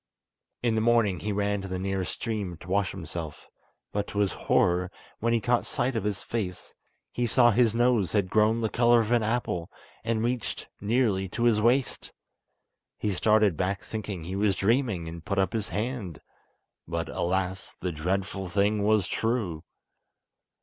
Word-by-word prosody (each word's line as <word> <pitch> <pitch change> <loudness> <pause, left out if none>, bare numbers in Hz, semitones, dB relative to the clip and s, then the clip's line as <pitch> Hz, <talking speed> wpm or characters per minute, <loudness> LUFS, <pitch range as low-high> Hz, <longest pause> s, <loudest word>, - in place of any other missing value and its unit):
In 120 -2 +2
the 110 - +1
morning 115 -5 +3
he 105 - -3
ran 100 0 0
to 95 - -6
the 95 -1 -3
nearest 95 -3 -2
stream 105 -7 -3
to 85 - -13
wash 100 0 +2
himself, 80 -3 -7 0.5
but 100 0 -2
to - - -7
his 100 -2 +2
horror, 90 +1 +2 0.3
when 115 +1 +1
he 115 - +3
caught 120 +1 +1
sight 125 +1 -1
of 110 -3 -1
his 105 -1 -2
face, 95 -6 -4 0.4
he 120 0 -1
saw 120 +2 +5
his 115 0 +3
nose 120 -8 +2
had 100 -3 +2
grown 110 +1 +3
the 110 - 0
colour 120 +1 +4
of 110 +1 -3
an 120 -1 +4
apple, 110 -6 -1 0.3
and 115 -1 0
reached 120 0 -2
nearly 105 -3 +1
to 120 - -3
his 115 -3 +4
waist. 125 +4 +1 0.9
He 105 - -1
started 105 -1 +3
back 95 +3 -1
thinking 100 -5 -5
he 90 +4 -5
was 100 -1 +2
dreaming, 110 -5 +1
and 80 0 -8
put 100 - -2
up 95 -1 +1
his 110 -2 -2
hand; 110 - -3 0.7
but, - - -2
alas! 95 +1 -2
the 90 - -2
dreadful 95 +4 -2
thing 100 +3 +2
was 105 -2 +3
true. 110 -9 -1
105 Hz, 170 wpm, -27 LUFS, 95-115 Hz, 0.9 s, saw